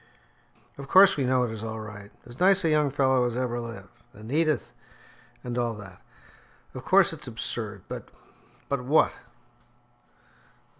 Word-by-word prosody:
"Of 140 - -8
course, 195 +4 +7
we 140 - -1
know 125 0 +2
it 120 - -2
is 110 -1 -7
all 110 0 -5
right 105 -2 -9 0.2
as 120 +1 -13
nice 195 +1 +4
a - - +3
young 150 -2 +3
fellow 130 -2 +2
as 120 0 -2
ever 125 -1 -2
lived 115 -5 -9
and 110 +3 -11
Edith 155 -2 +1 0.7
and 125 0 -3
all 120 -2 -1
that. 100 -3 -12 0.7
Of 130 - -8
course, 190 0 +4
it's 150 -4 -9
absurd, 110 -4 -5
but - - -7 0.3
" - - -31
"But 140 -3 -2
what?" 145 +5 +3
125 Hz, 160 wpm, -26 LUFS, 110-145 Hz, 0.7 s, course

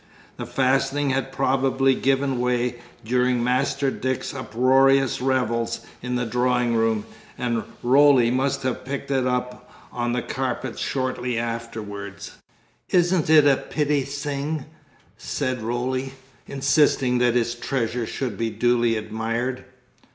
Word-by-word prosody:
The - - -5
fastening 135 +2 +1
had 135 0 -1
probably 135 0 +2
given 135 0 0
way 125 0 0 0.3
during 125 +1 +1
Master 135 +2 +1
Dick's 130 -1 -3
uproarious 135 +1 +3
revels 115 -3 0 0.2
in 125 0 -3
the 125 0 0
drawing 125 0 +1
room, 115 -2 +1 0.3
and 120 -2 -1 0.2
Roly 130 -1 +5
must 130 +2 0
have 130 -1 -2
picked 140 +1 -5
it 130 -2 +1
up 125 0 -3 0.2
on 120 0 -2
the 125 - -1
carpet 130 -1 -3
shortly 125 -2 -2
afterwards. 110 -4 -5 0.6
"Isn't 175 -3 +2
it 155 -2 +7
a 140 -2 +5
pitty 150 -1 0
sing?" 145 +1 -3 0.5
said 130 -2 -2
Roly, 130 +3 -2 0.3
insisting 135 -2 +2
that 120 -1 +2
his 120 -1 +1
treasure 120 -1 -2
should 120 -7 -4
be 115 0 0
duly 120 0 +2
admired. 115 +4 -3
125 Hz, 125 wpm, -23 LUFS, 120-135 Hz, 0.6 s, it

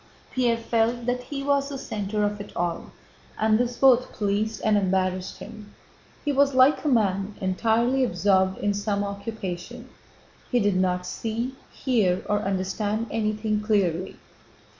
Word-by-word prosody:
Pierre 240 -3 +2
felt 230 +1 0
that 250 0 0
he 275 -1 -5
was 280 0 +1
the 280 - -5
center 210 -4 -3
of 205 0 -1
it 205 - -9
all, 175 -1 -2 0.5
and 215 0 +3
this 245 0 -1
both 255 -2 +5
pleased 210 +1 -1
and 215 -1 +4
embarrassed 185 -1 0
him. 210 -1 -11 0.5
He 295 - +2
was 280 -1 +3
like 260 +3 +5
a - - -1
man 205 -5 +1
entirely 230 +7 +1
absorbed 190 -2 +2
in 205 - 0
some 205 0 -1
occupation. 200 +3 -6 0.6
He 245 - +3
did 205 -3 +2
not 180 -1 +1
see, 230 +6 -3 0.2
hear, 205 -9 +1
or 205 0 +1
understand 205 +3 -2
anything 215 -1 -1
clearly. 190 -5 0
215 Hz, 145 wpm, -25 LUFS, 195-240 Hz, 0.6 s, both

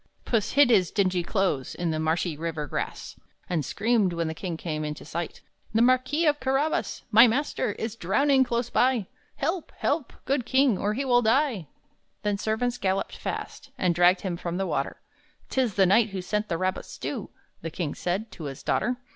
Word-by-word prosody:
Puss 220 -4 0
hid 280 -2 +6
his 185 -7 +4
dingy 185 -3 +1
clothes 175 - -1
In 175 -2 -1
the 155 - -1
marshy 160 +1 0
river 160 -1 -3
grass. - - -5 0.3
And 165 -4 0
screamed, 215 - +1
when 170 -1 -1
the 160 - -2
king 170 0 -5
came 155 -2 -3
into 150 0 -5
sight, 165 +2 -5 0.3
"The 225 - +4
Marquis 255 +6 +3
of 295 -1 +3
Carabas 270 +4 0
My 230 +3 +9
master 240 -3 0
is 225 +1 -4
drowning 265 +8 +3
close 240 -1 -2
by! 250 -5 +2 0.3
Help! 330 +4 -2
help! 295 -3 -1
good 270 -1 +1
king, 260 -1 +3
or 205 +3 -1
he 275 +3 -2
will 245 -2 +4
die!" 230 - +1 0.6
Then 205 -1 0
servants 235 +3 -1
galloped 190 0 -1
fast, 285 - -6
And 180 -2 +2
dragged 175 +2 +4
him 180 -3 -3
from 170 0 -4
the 195 - 0
water. 150 -5 -2 0.5
"'Tis 250 -7 0
the 195 - +5
knight 215 +4 +4
who 195 -1 -4
sent 210 +3 -2
the 165 - 0
rabbit 185 +2 -1
stew," - - -5 0.3
The 165 - -4
king 155 -2 -3
said, 195 +6 -3
to 160 - -8
his 135 -2 -7
daughter. 245 +1 0
205 Hz, 190 wpm, -26 LUFS, 175-245 Hz, 0.6 s, My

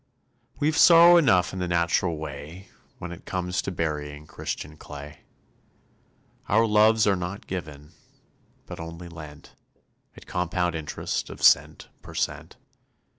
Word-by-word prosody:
We've 150 +1 +1
sorrow 170 +1 +8
enough 95 - +3
in 95 - -5
the 90 - -2
natural 85 0 +1
way, 80 +4 -8 0.3
When 85 - -7
it 85 - -11
comes 90 -1 -2
to - - -4
burying 75 -3 -4
Christian 75 0 -6
clay. 75 0 -10 1.3
Our 110 +3 +4
loves 110 0 +4
are 100 -2 +3
not 90 +2 -6
given, 75 -5 -7 0.7
but - - -9
only 85 +1 -8
lent, 75 -3 -12 0.6
At - - -13
compound 90 -1 -1
interest 80 -2 -4
of - - -10
cent - - +3
per - - -12
cent. - - -3
90 Hz, 130 wpm, -25 LUFS, 80-95 Hz, 1.3 s, sorrow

